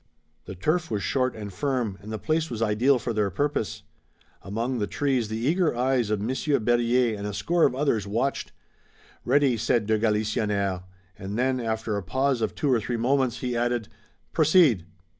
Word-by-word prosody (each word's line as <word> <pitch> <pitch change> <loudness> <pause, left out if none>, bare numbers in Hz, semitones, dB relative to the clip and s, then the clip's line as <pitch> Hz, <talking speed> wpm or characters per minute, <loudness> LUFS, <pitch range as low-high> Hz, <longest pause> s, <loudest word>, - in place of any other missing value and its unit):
The 95 - -7
turf 160 - 0
was 105 -3 -2
short 130 +6 0
and 105 -3 -7
firm, 120 -4 -2
and 105 +2 -9
the 110 - -3
place 160 +5 -1
was 115 - -5
ideal 115 +5 +3
for 120 -1 -3
their 105 -2 +1
purpose. 145 - -2 0.6
Among 115 +5 -3
the 105 - -1
trees 130 -4 0
the 110 - -3
eager 155 +4 +1
eyes 125 -3 +1
of 105 -1 0
Monsieur 130 +7 0
Berryer 120 0 +2
and 100 0 -5
a 105 - -4
score 165 - +2
of 125 - +1
others 125 -8 0
watched. 120 +7 -1 0.7
"Ready!" 135 -1 +3
said 110 0 +1
de 110 0 +1
Galisonnière, 105 -3 0 0.4
and 100 +2 -5
then, 130 +1 +1
after 110 -2 -2
a - - -2
pause 130 +6 0
of - - -1
two 140 -3 +1
or 120 - +3
three 120 +3 -2
moments, 130 +1 +1
he 125 -1 -2
added: 120 -2 -1 0.4
"Proceed!" 155 - +4
120 Hz, 180 wpm, -26 LUFS, 105-130 Hz, 0.7 s, Proceed